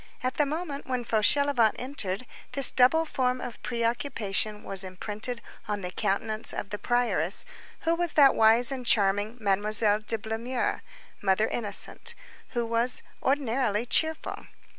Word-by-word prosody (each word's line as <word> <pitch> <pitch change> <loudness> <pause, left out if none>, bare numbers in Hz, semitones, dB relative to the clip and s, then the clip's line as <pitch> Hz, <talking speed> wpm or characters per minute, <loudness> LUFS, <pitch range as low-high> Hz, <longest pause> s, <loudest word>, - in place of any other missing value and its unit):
At 255 0 -2
the 295 - +2
moment 300 -1 -5
when 255 -2 -2
Fauchelevent 235 +2 +2
entered, 245 -5 -4 0.3
this 275 -3 +7
double 275 +6 +4
form 255 -4 -1
of 245 -2 -8
preoccupation 230 -3 -2
was 195 -1 -1
imprinted 210 +6 -5 0.2
on 205 -1 -3
the 180 -1 -5
countenance 215 +3 -1
of 200 - -6
the 210 - -4
prioress, 225 -8 +4 0.4
who 330 - +1
was 345 -1 -2
that 280 -3 +6
wise 225 +3 +4
and 260 -2 -4
charming 205 0 +1
Mademoiselle 210 +1 +2
de 220 +1 -2
Blemeur, 225 +4 -3 0.4
Mother 200 +2 +2
Innocente, 240 - -2 0.3
who 240 -2 -2
was 230 +2 +1 0.2
ordinarily 250 -5 0
cheerful. 315 +5 -1
230 Hz, 140 wpm, -27 LUFS, 210-260 Hz, 0.4 s, this